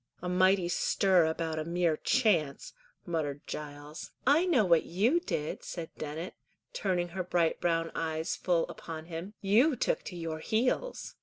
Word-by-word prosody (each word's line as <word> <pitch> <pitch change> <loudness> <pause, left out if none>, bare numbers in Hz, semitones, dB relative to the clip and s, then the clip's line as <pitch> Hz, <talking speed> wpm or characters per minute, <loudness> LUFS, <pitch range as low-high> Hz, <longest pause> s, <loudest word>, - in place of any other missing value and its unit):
"A 180 - -5
mighty 185 0 +3
stir 180 0 +3
about 160 0 -2
a - - -1
mere 170 0 +1
chance," 160 - +1 0.3
muttered 150 -5 -3
Giles. 150 +1 -7 0.2
"I 305 +7 +4
know 260 - +4
what 170 -3 +4
you 220 - +2
did," 155 - -3
said 170 -3 -6
Dennet, 155 +4 -5 0.4
turning 180 - 0
her 185 +2 -3
bright 175 -2 +1
brown 165 -1 +1
eyes 160 +1 -2
full 175 -3 +1
upon 160 -1 -8
him. 170 +5 -7
"You 235 +10 +4
took - - 0
to 180 - -6
your 165 -2 -4
heels." 250 - -1
175 Hz, 155 wpm, -30 LUFS, 160-195 Hz, 0.4 s, I